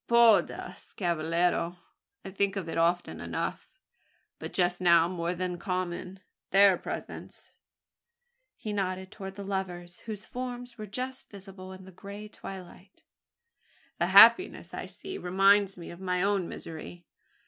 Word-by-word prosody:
"Por 235 Hz, -3 st, +7 dB
Dios, -, -, -10 dB
cavallero! 170 Hz, 0 st, 0 dB, 0.5 s
I 190 Hz, -, -6 dB
think 200 Hz, +1 st, 0 dB
of 190 Hz, -4 st, -3 dB
it 165 Hz, -, -4 dB
often 170 Hz, +1 st, +1 dB
enough; -, -, -4 dB, 0.7 s
but -, -, -6 dB
just 180 Hz, 0 st, +1 dB
now 170 Hz, -2 st, +6 dB
more 175 Hz, 0 st, -2 dB
than 180 Hz, -1 st, -3 dB
common. 185 Hz, +1 st, -4 dB, 0.3 s
Their 195 Hz, 0 st, +6 dB
presence -, -, -7 dB, 0.5 s
" 485 Hz, +1 st, -51 dB
he 215 Hz, -, -3 dB
nodded 190 Hz, -1 st, -2 dB
towards 195 Hz, -2 st, -8 dB
the 200 Hz, -, -7 dB
lovers, 180 Hz, -3 st, -4 dB
whose 215 Hz, -1 st, -5 dB
forms 245 Hz, -1 st, -6 dB
were 215 Hz, -, -6 dB
just 255 Hz, +5 st, -5 dB
visible 190 Hz, -2 st, -11 dB
in 190 Hz, 0 st, -10 dB
the 190 Hz, -, -12 dB
grey 200 Hz, +3 st, -9 dB
twilight, 190 Hz, -1 st, -11 dB, 1.0 s
"the 175 Hz, -, +2 dB
happiness 225 Hz, -, +7 dB
I -, -, -5 dB
see 385 Hz, 0 st, -7 dB
reminds 195 Hz, +2 st, +4 dB
me 170 Hz, -, -8 dB
of 170 Hz, -, -11 dB
my 180 Hz, -1 st, 0 dB
own 200 Hz, -3 st, +1 dB
misery. 165 Hz, +2 st, -8 dB
190 Hz, 145 wpm, -29 LUFS, 175-205 Hz, 1.0 s, Por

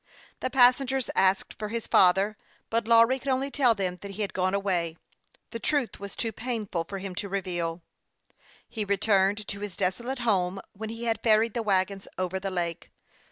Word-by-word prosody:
The -, -, -2 dB
passengers 260 Hz, 0 st, +3 dB
asked 190 Hz, 0 st, +2 dB
for 210 Hz, -, -3 dB
his 230 Hz, +1 st, -3 dB
father; 195 Hz, +3 st, +4 dB, 0.4 s
but 230 Hz, -1 st, 0 dB
Lawry 230 Hz, +3 st, +5 dB
could 265 Hz, -, -12 dB
.only 270 Hz, +2 st, 0 dB
tell 250 Hz, -5 st, +3 dB
them 185 Hz, -3 st, -2 dB
that 200 Hz, -, -7 dB
he 210 Hz, +2 st, -3 dB
had 200 Hz, -, -4 dB
gone 185 Hz, +1 st, +1 dB
away: 175 Hz, -5 st, -1 dB, 0.5 s
the 230 Hz, -, -5 dB
truth 285 Hz, -1 st, -1 dB
was 200 Hz, 0 st, -8 dB
too 225 Hz, -, -2 dB
painful 215 Hz, -7 st, -3 dB
for 195 Hz, -, -6 dB
him 195 Hz, -1 st, -6 dB
to 200 Hz, +3 st, -5 dB
reveal. 175 Hz, -3 st, -3 dB, 0.8 s
He 220 Hz, -, -3 dB
returned 200 Hz, 0 st, +2 dB
to 200 Hz, -, -5 dB
his 205 Hz, -2 st, -6 dB
desolate 235 Hz, +8 st, -1 dB
home 190 Hz, -3 st, +1 dB
when 220 Hz, +2 st, -6 dB
he 230 Hz, +1 st, -6 dB
had 225 Hz, -2 st, 0 dB
ferried 220 Hz, 0 st, +3 dB
the 235 Hz, -, -1 dB
wagons 195 Hz, -2 st, 0 dB
over 185 Hz, 0 st, -2 dB
the 195 Hz, +1 st, -3 dB
lake. 175 Hz, -3 st, -3 dB
200 Hz, 185 wpm, -27 LUFS, 190-230 Hz, 0.8 s, Lawry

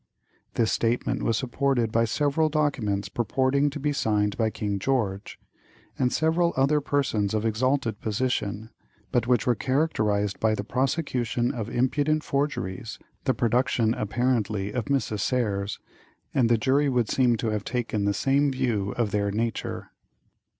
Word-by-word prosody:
This 115 Hz, -2 st, +2 dB
statement 115 Hz, +1 st, 0 dB
was 115 Hz, -, +1 dB
supported 130 Hz, -2 st, 0 dB
by 115 Hz, 0 st, +3 dB
several 145 Hz, +7 st, +1 dB
documents 135 Hz, -10 st, 0 dB
purporting 130 Hz, +5 st, +1 dB
to 145 Hz, +1 st, -6 dB
be 145 Hz, +1 st, 0 dB
signed 105 Hz, -5 st, +1 dB
by 110 Hz, -1 st, +1 dB
King 105 Hz, -1 st, -3 dB
George, 100 Hz, -5 st, -1 dB, 0.6 s
and 125 Hz, -1 st, +2 dB
several 165 Hz, +2 st, +2 dB
other 145 Hz, +3 st, +3 dB
persons 115 Hz, -8 st, 0 dB
of 110 Hz, +1 st, -1 dB
exalted 115 Hz, 0 st, 0 dB
position, 110 Hz, -1 st, -2 dB, 0.4 s
but 120 Hz, -1 st, +1 dB
which 120 Hz, -3 st, +2 dB
were 125 Hz, -, +4 dB
characterized 110 Hz, -8 st, 0 dB
by 110 Hz, -1 st, +2 dB
the 100 Hz, -, -4 dB
prosecution 125 Hz, -1 st, -1 dB
as 115 Hz, -3 st, -4 dB
impudent 145 Hz, +5 st, +1 dB
forgeries, 125 Hz, -8 st, -2 dB, 0.3 s
the 130 Hz, -, +2 dB
production, 120 Hz, -1 st, +2 dB
apparently, 105 Hz, -3 st, -1 dB
of 125 Hz, -, -2 dB
Mrs. 135 Hz, -7 st, -1 dB
Serres, 100 Hz, -4 st, -1 dB, 0.6 s
and 125 Hz, -4 st, +3 dB
the 120 Hz, -, +4 dB
jury 140 Hz, +5 st, +2 dB
would 125 Hz, -4 st, +1 dB
seem 125 Hz, -1 st, +3 dB
to 115 Hz, -, -1 dB
have 105 Hz, -1 st, -2 dB
taken 115 Hz, -4 st, -2 dB
the 100 Hz, -, +2 dB
same 140 Hz, +5 st, +2 dB
view 115 Hz, -7 st, -1 dB
of 115 Hz, -4 st, 0 dB
their 100 Hz, 0 st, 0 dB
nature. 115 Hz, +3 st, -3 dB
120 Hz, 150 wpm, -26 LUFS, 105-135 Hz, 0.6 s, were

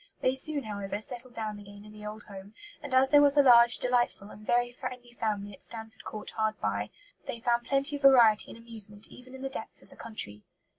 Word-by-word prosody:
They 255 Hz, -, +2 dB
soon, 285 Hz, +2 st, +2 dB
however, 200 Hz, -2 st, -4 dB
settled 240 Hz, +3 st, -7 dB
down 215 Hz, -2 st, -4 dB
again 205 Hz, 0 st, -13 dB
in 210 Hz, -, -13 dB
the 210 Hz, 0 st, -9 dB
old 215 Hz, +1 st, -8 dB
home; 200 Hz, +1 st, -12 dB, 0.3 s
and 280 Hz, -3 st, -3 dB
as 265 Hz, +1 st, +4 dB
there 290 Hz, -1 st, +7 dB
was 285 Hz, 0 st, +4 dB
a 285 Hz, -, +7 dB
large, 235 Hz, -2 st, +7 dB
delightful, 240 Hz, -5 st, 0 dB
and 210 Hz, -, -13 dB
very 240 Hz, +2 st, +1 dB
friendly 250 Hz, -1 st, -8 dB
family 205 Hz, -3 st, -3 dB
at -, -, -14 dB
Stanford 220 Hz, -1 st, -6 dB
Court 210 Hz, -1 st, -5 dB
hard 220 Hz, -1 st, -1 dB
by, -, -, -2 dB, 0.4 s
they 235 Hz, -, -5 dB
found 240 Hz, +1 st, 0 dB
plenty 275 Hz, +1 st, +3 dB
of -, -, -13 dB
variety 240 Hz, -6 st, +6 dB
and -, -, -10 dB
amusement 220 Hz, -3 st, -6 dB
even 255 Hz, +1 st, -13 dB
in 265 Hz, -, -9 dB
the -, -, -1 dB
depths 270 Hz, -, -3 dB
of -, -, -21 dB
the -, -, -14 dB
country. 105 Hz, -, -6 dB
230 Hz, 225 wpm, -29 LUFS, 210-255 Hz, 0.4 s, there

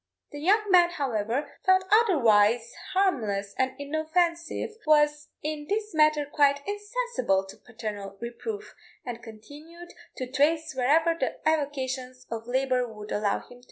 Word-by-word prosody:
The 290 Hz, -, -7 dB
young 410 Hz, +6 st, +2 dB
man, 350 Hz, -2 st, +6 dB
however, 270 Hz, -2 st, -2 dB
though 375 Hz, 0 st, +7 dB
otherwise 235 Hz, -, +4 dB, 0.2 s
harmless 220 Hz, -, 0 dB
and 260 Hz, 0 st, +1 dB
inoffensive, 315 Hz, +6 st, -1 dB, 0.2 s
was 295 Hz, -1 st, +3 dB, 0.2 s
in 300 Hz, -1 st, -4 dB
this 425 Hz, -1 st, -2 dB
matter 305 Hz, -1 st, +3 dB
quite 280 Hz, -1 st, +2 dB
insensible 415 Hz, -, -1 dB
to 190 Hz, -, -12 dB
paternal 205 Hz, -4 st, -7 dB
reproof, 410 Hz, -, -6 dB, 0.3 s
and 240 Hz, -1 st, -6 dB
continued 295 Hz, +10 st, -12 dB, 0.2 s
to 255 Hz, -, -3 dB
trace 305 Hz, +5 st, +1 dB
whenever 305 Hz, +6 st, +3 dB
the 330 Hz, -, -3 dB
avocations 260 Hz, -4 st, -2 dB
of 225 Hz, 0 st, -5 dB
labour 255 Hz, 0 st, +1 dB
would 210 Hz, -1 st, -10 dB
allow 210 Hz, -1 st, -1 dB
him. 245 Hz, -, -14 dB
285 Hz, 130 wpm, -27 LUFS, 240-335 Hz, 0.3 s, though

